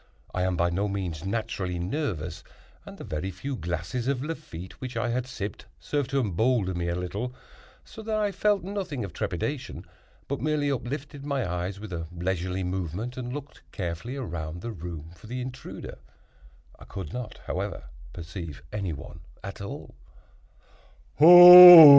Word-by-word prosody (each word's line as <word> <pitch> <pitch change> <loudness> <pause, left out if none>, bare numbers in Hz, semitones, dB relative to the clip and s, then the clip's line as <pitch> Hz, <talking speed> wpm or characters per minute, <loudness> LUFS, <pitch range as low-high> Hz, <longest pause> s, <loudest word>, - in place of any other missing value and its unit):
I 90 - -1
am 90 -1 0
by 85 +1 +1
no 100 +4 -1
means 90 -6 -4
naturally 95 -3 -3
nervous, 90 - -3 0.4
and - - -10
the - - -9
very 80 +5 -4
few 100 +10 -5
glasses 90 +6 -4
of 135 -2 -1
Lafitte 150 - -8
which 130 -2 -5
I 115 +1 -1
had 125 +1 -2
sipped 105 -5 -6
served 140 - -2
to 135 0 +1
embolden 105 -3 0
me 85 - -2
no 85 - -1
little, 100 +8 -4 0.5
so 220 - -11
that 220 0 -3
I 210 -1 0
felt 205 +1 +1
nothing 185 - -4
of 90 - -10
trepidation, 125 - -4 0.4
but 140 - -3
merely 150 -1 0
uplifted 140 +2 -5
my 140 -6 -2
eyes 90 +2 -4
with 105 -3 -8
a 80 -1 -4
leisurely 90 +1 -3
movement, 95 +6 -4
and 125 -1 -5
looked 145 +1 -8
carefully 90 +6 -5
around 85 - -5
the 120 - -5
room 85 -4 -8
for 85 - -15
the 125 +3 -5
intruder. 130 +1 -8 0.8
I - - -13
could 95 -6 -7
not, 125 -3 -6
however, - - -4 0.3
perceive 85 -3 -8
any 100 -5 -3
one 75 +3 -10 0.2
at 100 +1 -7
all. 100 - -8
100 Hz, 160 wpm, -26 LUFS, 90-130 Hz, 0.8 s, by